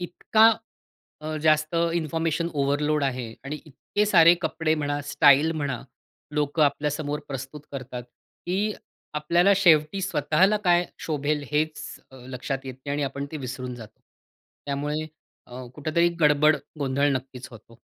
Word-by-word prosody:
इतका 215 +5 +4 0.7
अ, 155 0 -4
जास्त 155 +1 +2 0.2
information 165 0 -1
overload 145 +1 +1
आहे 125 -4 -3
आणि 150 +2 -5
इतके 160 +8 -2
सारे 170 -3 +7
कपडे 160 -1 0
म्हणा, 145 -1 -2
स्टाईल 145 +2 +5
म्हणा 145 -6 -3 0.5
लोकं 150 +1 +1
आपल्या 145 +1 +1
समोर 150 0 -3
प्रस्तुत 135 +2 -7
करतात, 125 -2 -6 0.4
की 200 +4 0 0.4
आपल्याला 170 +6 +3
शेवटी 170 -1 +4
स्वतःला 190 +3 +2
काय 175 0 +4 0.2
शोभेल 150 -1 -1
हेच 155 0 0 0.3
अ, - - -14
लक्षात 135 +1 -5
येत 130 - -5
नाही 140 - -2
आणि 145 0 -1
आपण 140 +1 -3
ते 155 - -4
विसरून 125 -1 -6
जातो. 110 -2 -13 0.7
त्यामुळे 145 +2 -2 0.4
अ, 125 +1 -8
कुठेतरी 160 +3 +1
गडबड 150 0 +5 0.2
गोंधळ 140 +1 +1
नक्कीच 130 0 -6
होतो. 115 0 -15
150 Hz, 135 wpm, -25 LUFS, 140-160 Hz, 0.7 s, सारे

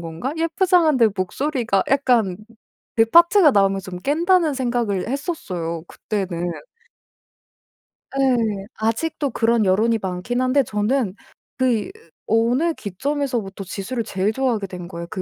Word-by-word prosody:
건가?' 165 - -5
예쁘장한데 330 - +3
목소리가 230 +2 -1
약간 245 -9 +2 0.6
걔 225 - +6
파트가 340 - +6
나오면 195 -1 +3
좀 185 -2 -8
깬다는 325 - +2
생각을 240 -7 -1
했었어요 180 - -4
그때는. 185 -5 -4 1.7
예. 230 -7 +1
아직도 275 +6 -1
그런 230 -2 +2
여론이 220 +4 +2
많기는 190 +7 -2
한데 270 +2 +3
저는 215 0 0 0.4
그 245 -6 +1 0.4
어느 245 +9 +2
기점에서부터 235 -2 -3
지수를 200 +6 -4
제일 200 +2 -1
좋아하게 240 -6 0
된 180 -2 -8
거예요 170 -1 -7
그 185 - -4
230 Hz, 290 characters per minute, -21 LUFS, 195-275 Hz, 1.7 s, 걔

